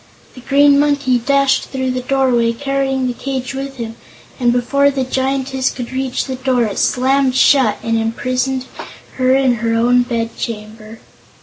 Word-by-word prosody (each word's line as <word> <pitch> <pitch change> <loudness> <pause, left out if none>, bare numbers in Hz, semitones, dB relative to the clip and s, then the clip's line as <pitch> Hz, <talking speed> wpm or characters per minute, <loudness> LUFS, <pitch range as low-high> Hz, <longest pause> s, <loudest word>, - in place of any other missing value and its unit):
The 255 - -12
Green 280 +2 +4
Monkey 285 -4 +2
dashed 275 +2 +2
through 260 -1 -3
the 255 0 -3
doorway, 250 -3 +1
carrying 270 0 -1
the 250 - -1
cage 265 0 -4
with 270 0 -5
him, 230 -1 -6 0.4
and 240 -2 +2
before 280 +4 +2
the 270 -1 -2
Giantess 265 0 -1
could 245 -1 -7
reach 260 -1 -2
the 260 -2 -5
door 255 -2 +1
it 210 -3 -3
slammed 260 +1 +1
shut 260 -6 +4
and 230 0 0
imprisoned 255 +3 -2 0.5
her 255 0 +3
in 260 -3 +2
her 230 -1 0
own 245 +2 +3
bed 230 -2 -3
chamber! 215 0 -7
255 Hz, 165 wpm, -17 LUFS, 240-270 Hz, 0.5 s, Green